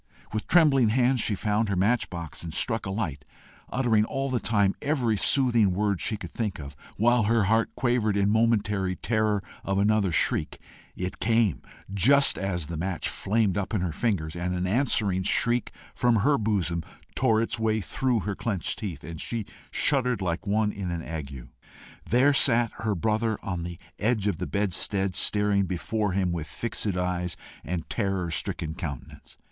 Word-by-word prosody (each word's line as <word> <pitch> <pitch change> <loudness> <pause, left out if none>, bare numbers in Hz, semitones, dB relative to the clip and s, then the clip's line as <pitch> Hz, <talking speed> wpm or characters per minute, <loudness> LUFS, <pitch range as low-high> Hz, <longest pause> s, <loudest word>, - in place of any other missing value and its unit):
With 110 - -3
trembling 140 -9 +5
hands 125 +2 +2
she 105 - +1
found 105 +2 0
her 100 - 0
match 105 +6 +1
box 85 -4 -7
and 85 - -6
struck 110 +6 0
a - - -3
light, 90 -9 -3 0.5
uttering 120 -5 +2
all 135 +3 -2
the 125 - +1
time 100 -4 +2
every 135 -7 +1
soothing 120 -4 +3
word 100 -2 0
she 110 - 0
could 90 -5 -8
think 105 -5 -3
of, 70 -1 -9 0.2
while 120 +1 +3
her 115 0 +3
heart 110 +3 +2
quavered 120 -5 +1
in 100 0 +2
momentary 105 -4 +1
terror 110 -2 0 0.2
of 95 0 -1
another 100 -1 +2
shriek. - - +1 0.4
It 90 +1 -5
came 110 - +2 0.3
just 140 +9 +5
as 90 -4 -2
the 80 +2 -5
match 90 +1 -1
flamed 100 -1 0
up 100 +3 -3
in 100 - 0
her 90 -2 -1
fingers, 85 -5 -1
and 90 +1 -2
an 90 0 -1
answering 105 -3 +2
shriek 120 +5 +1 0.2
from 120 -1 +2
her 130 +6 +3
bosom 95 -6 0 0.3
tore 115 -4 +2
its 115 0 0
way 110 -1 +1
through 120 +3 -1
her 100 +2 -3
clenched 100 -2 -2
teeth, 90 -9 -5
and 80 -2 -7
she 115 -3 -3 0.2
shuddered 125 -4 +2
like 90 +1 -3
one 105 +1 +1
in 100 -3 -5
an 85 -1 -3
ague. 70 -6 -7 0.6
There 130 +5 +4
sat 120 -4 +3
her 110 -2 -1
brother 110 +3 0
on 90 -3 -3
the 85 0 -6 0.2
edge 110 -2 +1
of 100 -6 0
the - - -3
bedstead 100 -1 -1
staring 105 0 +2
before 100 +3 -2
him 95 -2 0
with 80 -3 -4
fixed 115 +2 -4
eyes 90 -1 -2 0.3
and 85 +2 -4
terror 95 -6 -2
stricken 80 0 -3
countenance. 75 -8 -8
105 Hz, 175 wpm, -26 LUFS, 90-115 Hz, 0.6 s, trembling